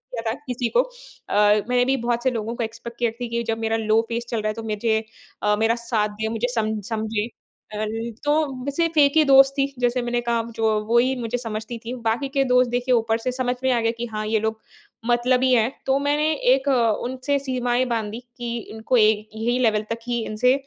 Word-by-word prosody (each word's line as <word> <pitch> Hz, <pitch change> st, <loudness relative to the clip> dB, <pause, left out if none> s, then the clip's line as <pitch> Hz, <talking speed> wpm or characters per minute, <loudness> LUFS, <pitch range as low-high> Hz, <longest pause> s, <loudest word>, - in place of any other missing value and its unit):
किया 230 Hz, -, -3 dB
था -, -, -1 dB
किसी 245 Hz, -1 st, -1 dB
को। -, -, +7 dB
अ, -, -, -9 dB, 0.3 s
मैंने 250 Hz, 0 st, +3 dB
भी 270 Hz, +1 st, +2 dB
बहुत 240 Hz, 0 st, 0 dB
से 260 Hz, -, +2 dB
लोगों 230 Hz, 0 st, -3 dB
को 235 Hz, -, -2 dB
एक्सपेक्ट 230 Hz, +1 st, -7 dB
किए 235 Hz, -1 st, +2 dB
थे 240 Hz, -, -2 dB
कि 235 Hz, 0 st, -1 dB
जब 225 Hz, -1 st, -2 dB
मेरा 225 Hz, 0 st, 0 dB
लो 220 Hz, 0 st, +3 dB
फेज़ 235 Hz, +1 st, -2 dB
चल 225 Hz, -2 st, -1 dB
रहा 215 Hz, -, -2 dB
है 215 Hz, -, 0 dB
तो 225 Hz, 0 st, -7 dB
मुझे 220 Hz, +1 st, 0 dB, 0.4 s
अ, 210 Hz, 0 st, +3 dB
मेरा 225 Hz, +1 st, +3 dB
साथ 230 Hz, -3 st, -1 dB
दें, 215 Hz, +1 st, -4 dB
मुझे 240 Hz, -, 0 dB
सम 220 Hz, -1 st, 0 dB
समझे। 220 Hz, 0 st, -1 dB, 0.5 s
अल 215 Hz, 0 st, -2 dB, 0.3 s
तो 285 Hz, -3 st, 0 dB
सिर्फ़ 330 Hz, +2 st, -1 dB
एक 280 Hz, -1 st, +5 dB
ही 310 Hz, -, +7 dB
दोस्त 270 Hz, 0 st, +7 dB
थी 275 Hz, -, +3 dB
जैसे 245 Hz, 0 st, +1 dB
मैंने 240 Hz, 0 st, -1 dB
कहा 235 Hz, -1 st, 0 dB
जो 225 Hz, -, 0 dB, 0.2 s
वही 240 Hz, +3 st, +3 dB
मुझे 235 Hz, +1 st, -2 dB
समझती 225 Hz, 0 st, -5 dB
थी। 240 Hz, -, -4 dB
बाकी 240 Hz, +5 st, 0 dB
के 275 Hz, 0 st, +1 dB
दोस्त 250 Hz, -1 st, +4 dB
देखिए 245 Hz, +1 st, +1 dB
ऊपर 225 Hz, -1 st, +1 dB
से 255 Hz, +2 st, -2 dB
समझ 250 Hz, 0 st, -1 dB
में 260 Hz, -, +3 dB
आ 240 Hz, -, +2 dB
गए 230 Hz, 0 st, +2 dB
कि 235 Hz, +1 st, -5 dB
हाँ, 215 Hz, -2 st, -4 dB
ये 220 Hz, 0 st, +2 dB
लोग 220 Hz, 0 st, -2 dB, 0.5 s
मतलबी 250 Hz, +2 st, +2 dB
हैं। 235 Hz, +1 st, +3 dB
तो 270 Hz, 0 st, +2 dB
मैंने 295 Hz, +2 st, +1 dB, 0.2 s
एक 270 Hz, +1 st, -1 dB, 0.4 s
उनसे 260 Hz, +3 st, -1 dB
सीमाएँ 255 Hz, -2 st, 0 dB
बाँधी 225 Hz, -2 st, -2 dB, 0.2 s
कि 240 Hz, -1 st, -3 dB
इनको 220 Hz, +3 st, 0 dB
एक 215 Hz, -1 st, +3 dB
यही 235 Hz, +3 st, 0 dB
लेवल 215 Hz, -3 st, +2 dB
तक 230 Hz, -, -3 dB
ही 240 Hz, -1 st, -1 dB
इनसे 250 Hz, +4 st, +2 dB
235 Hz, 220 wpm, -23 LUFS, 225-255 Hz, 0.5 s, को